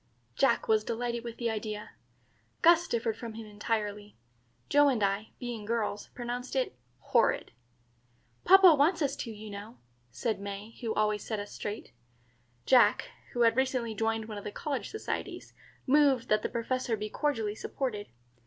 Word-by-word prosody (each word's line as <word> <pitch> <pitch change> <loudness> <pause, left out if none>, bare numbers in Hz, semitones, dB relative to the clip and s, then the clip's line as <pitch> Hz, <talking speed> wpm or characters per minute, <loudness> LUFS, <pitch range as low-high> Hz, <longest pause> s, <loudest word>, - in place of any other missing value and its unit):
Jack 255 -4 +2
was 220 -1 +3
delighted 235 +1 -2
with 235 -1 -7
the 235 - -1
idea. 215 -1 -5 0.7
Gus 340 +1 +6
differed 230 -2 -1
from 230 -1 -7
him 225 0 -7
entirely. 210 -1 -3 0.5
Joe 290 0 +5
and 235 -6 +1
I, 200 +2 0
being 240 -3 -5
girls, 210 -2 -2
pronounced 245 +2 -4
it 255 - 0 0.2
horrid. 120 - +1 0.9
"Papa 380 -2 +8
wants 310 +3 +3
us 280 -1 0
to, 230 - -5
you 215 0 -9
know," 205 +4 -9 0.3
said 215 - -2
May, 200 +2 -6
who 225 -2 -2
always 210 -1 +1
sets 215 -3 -3
us 205 - -9
straight. 210 +1 -6 0.7
Jack, 255 -1 +4 0.2
who 240 - -1
had 230 -1 +5
recently 255 -3 0
joined 225 +1 -1
one 215 -2 -6
of - - -11
the 210 - -5
college 280 +4 -3
societies, 430 - -5 0.3
moved 275 -3 +4
that 215 0 +3
the - - -2
Professor 235 0 -1
be 210 +1 -3
cordially 225 -9 -1
supported. 215 -2 -4
225 Hz, 160 wpm, -30 LUFS, 210-255 Hz, 0.9 s, Papa